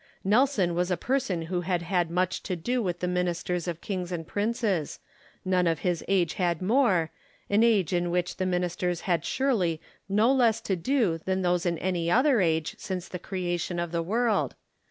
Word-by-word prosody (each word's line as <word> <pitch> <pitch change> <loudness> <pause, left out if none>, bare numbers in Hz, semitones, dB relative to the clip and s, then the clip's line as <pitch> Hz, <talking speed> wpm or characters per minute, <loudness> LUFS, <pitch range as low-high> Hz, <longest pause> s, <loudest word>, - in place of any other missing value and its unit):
Nelson 210 -4 +3
was 175 +1 0
a 180 - +1
person 200 - -1
who 175 +2 -2
had 175 -1 -1
had 175 -1 0
much 180 +2 0
to 185 - -3
do 245 +9 -1
with 180 -4 -3
the 180 - 0
ministers 180 -1 -1
of 170 -1 -4
kings 185 -3 -4
and 165 -2 -4
princes; 205 - -1 0.5
none 180 -1 +2
of 165 -2 0
his 175 -3 -1
age 180 -5 +2
had 175 -3 0
more, 185 - +2 0.2
— - - -34
an 205 +2 +4
age 210 -7 +3
in 175 0 +1
which 180 0 -1
the 185 - -1
ministers 180 -1 -1
had 170 -4 0
surely 190 - 0 0.3
no 215 +5 +4
less 235 -4 +3
to 195 - -1
do 195 -3 +1
than 190 +3 -1
those 180 0 +1
in 170 -1 0
any 175 -1 -1
other 255 - +4
age 160 -3 0
since 185 -1 -4
the 180 - -6
creation 175 -2 -3
of 170 -1 -2
the 170 -1 0
world. 220 +5 0
180 Hz, 195 wpm, -27 LUFS, 175-205 Hz, 0.5 s, an